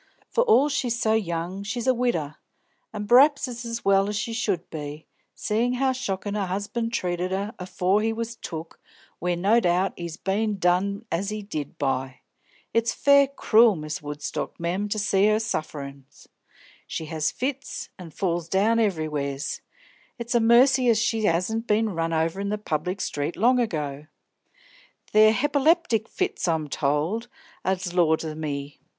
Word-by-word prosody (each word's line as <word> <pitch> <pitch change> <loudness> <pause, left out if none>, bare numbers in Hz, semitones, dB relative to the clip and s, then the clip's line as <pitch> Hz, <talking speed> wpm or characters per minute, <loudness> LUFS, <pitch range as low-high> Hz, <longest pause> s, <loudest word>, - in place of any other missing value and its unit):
For 485 - +3
all 435 - +5
she's 250 -5 -1
so 220 -2 +2
young, 180 -2 -2
she's 225 +4 -4
a 260 - +4
widder, 230 - -1 0.5
an' 210 -1 -5
pr'aps 275 +4 +6
it's 240 -1 -6
as 230 0 -5
well 195 +1 +3
she 215 +2 -3
should 200 -7 -1
be, 150 0 -6 0.3
seein' 235 +4 0
how 265 +1 +1
shockin' 205 -6 -3
her 205 -2 -1
'usband 205 +5 -3
treated 180 -4 -1
her 200 +3 -2
afore 185 +2 +1
he 225 +1 +1
was 230 +1 -4
took 165 -6 -8 0.4
where 180 +1 0
no 200 +7 +3
doubt 180 -1 +1
he's 170 -2 -6
bein' 205 +2 -1
done 195 +4 +1
as 190 +4 -1
he 210 0 -4
did 155 -8 -6
by. 130 -2 -2 0.5
It's 230 0 +1
fair 280 -1 +5
cruel, 230 -5 +4
Miss 155 -1 -5
Woodstock, 145 0 -5
mem, 180 +5 -2
to 215 - -1
see 200 -1 +3
her 215 0 +3
sufferin's. 140 -8 -6 0.6
She 160 - -4
has 155 -1 -1
fits, 275 +1 -4
an' 175 -2 -9
falls 170 0 -2
down 215 +5 +3
everywheres; 150 -8 -1 0.6
it's 235 0 -4
a 240 - +4
mercy 245 +2 +5
as 225 - +4
she 220 -1 +1
'asn't 220 +8 0
been 215 +1 +2
run 165 -2 -2
over 165 +4 0
in 200 - -2
the 210 - -1
public 180 0 -3
street 145 +3 -2
long 250 +4 +3
ago. 150 - -3 1.0
They're 215 0 +7
hepiplectic 285 - +2
fits, 375 - -2
I'm 160 -3 0
told, 155 - -1 0.4
an' 190 0 +1 0.2
laws 165 -2 +2
o' 155 - -4
me! 145 -2 -5
200 Hz, 160 wpm, -25 LUFS, 165-230 Hz, 1.0 s, They're